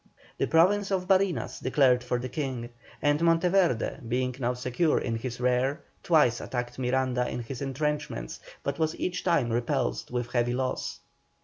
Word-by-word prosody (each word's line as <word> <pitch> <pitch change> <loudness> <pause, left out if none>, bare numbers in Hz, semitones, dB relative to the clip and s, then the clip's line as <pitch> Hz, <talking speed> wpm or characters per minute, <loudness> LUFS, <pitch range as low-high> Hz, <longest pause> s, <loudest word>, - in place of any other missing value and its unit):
The - - +1
Province 195 +5 +4
of 185 -2 -1
Barinas 190 - +1
declared 130 -2 +3
for 125 0 -1
the 125 +1 -4
King, 130 -4 -4 0.3
and 145 +1 +3
Monteverde, 170 - +2
being 125 +1 -1
now 125 -1 0
secure 125 +6 +1
in 115 - -1
his 120 +1 -5
rear, 125 +4 +1 0.2
twice 150 -8 +3
attacked 120 0 -4
Miranda 125 -1 0
in 120 - -4
his 125 +3 -7
entrenchments, 140 - -3 0.2
but 140 +3 -3
was 160 0 0
each 180 0 -2
time 145 -10 +2
repulsed 120 +2 -1
with 120 -1 -3
heavy 120 0 +1
loss. 130 0 -3
130 Hz, 155 wpm, -28 LUFS, 125-160 Hz, 0.3 s, Province